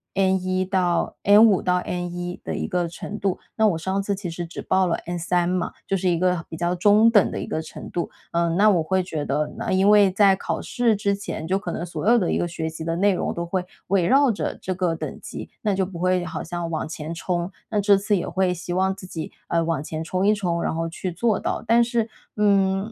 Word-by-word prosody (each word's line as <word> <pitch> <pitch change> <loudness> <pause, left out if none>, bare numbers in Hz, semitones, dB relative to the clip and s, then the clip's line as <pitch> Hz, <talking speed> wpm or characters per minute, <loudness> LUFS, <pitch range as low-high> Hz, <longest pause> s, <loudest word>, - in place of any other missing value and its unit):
N1 185 -1 +1
到 180 -3 +1
N5 205 -1 +6
到 180 0 +2
N1 175 0 -4
的 - - -4
一 - - -2
个 180 -4 0
程 205 +4 -7
度， 195 -2 -1 0.2
那 220 -1 +4
我 170 -5 +1
上 190 +4 -1
次 200 0 -1
其 190 -3 -5
实 170 +1 -5
只 165 - -7
报 190 0 +2
了 170 - 0
N3 175 0 0
嘛， 180 -1 -1 0.2
就 195 - +1
是 185 -1 +1
一 170 - +2
个 180 -2 +1
比 160 - -7
较 175 +1 0
中 210 +5 +5
等 205 -4 +4
的 - - -4
一 - - -4
个 160 - -2
程 160 - -9
度。 175 - -2 0.2
嗯， 170 0 +1
那 215 +1 +6
我 175 -5 +3
会 190 +3 +1
觉 155 -4 -4
得， 150 +2 -1
那 - - -3
因 190 +2 +4
为 205 -2 +6
在 195 0 +5
考 - - -3
试 240 -4 +1
之 200 0 0
前， 195 -5 -6
就 190 +2 +1
可 205 - -5
能 170 - -4
所 170 +4 -2
有 240 - +6
的 185 - +1
一 - - +1
个 175 - 0
学 160 -1 -4
习 160 0 -6
的 165 0 -1
内 200 +1 +3
容 - - -2
都 170 0 -3
会 180 +1 -1 0.2
围 185 -2 +2
绕 275 -1 +5
着 205 - -3
这 185 - -2
个 180 -2 0
等 - - -6
级， - - -8
那 210 -2 +1
就 190 -1 +1
不 180 -3 -8
会 185 0 +1
好 160 - -5
像 170 0 -4
往 160 -1 -2
前 155 +1 -5
冲。 175 +1 -2 0.2
那 210 -2 0
这 200 0 +5
次 200 +1 +1
也 - - -3
会 190 -1 +1
希 175 0 -5
望 190 +1 +1
自 185 - -11
己， 160 -3 -6 0.2
呃， 165 0 +1
往 165 -4 -1
前 155 +1 -5
冲 185 +4 0
一 210 - +5
冲， 175 -4 -1
然 - - -1
后 165 0 -2
去 180 +2 -4
做 220 +2 +1
到。 - - -3
但 230 +1 +4
是， 230 -1 -1 0.3
嗯， 200 0 +2
185 Hz, 265 characters per minute, -23 LUFS, 170-200 Hz, 0.3 s, N5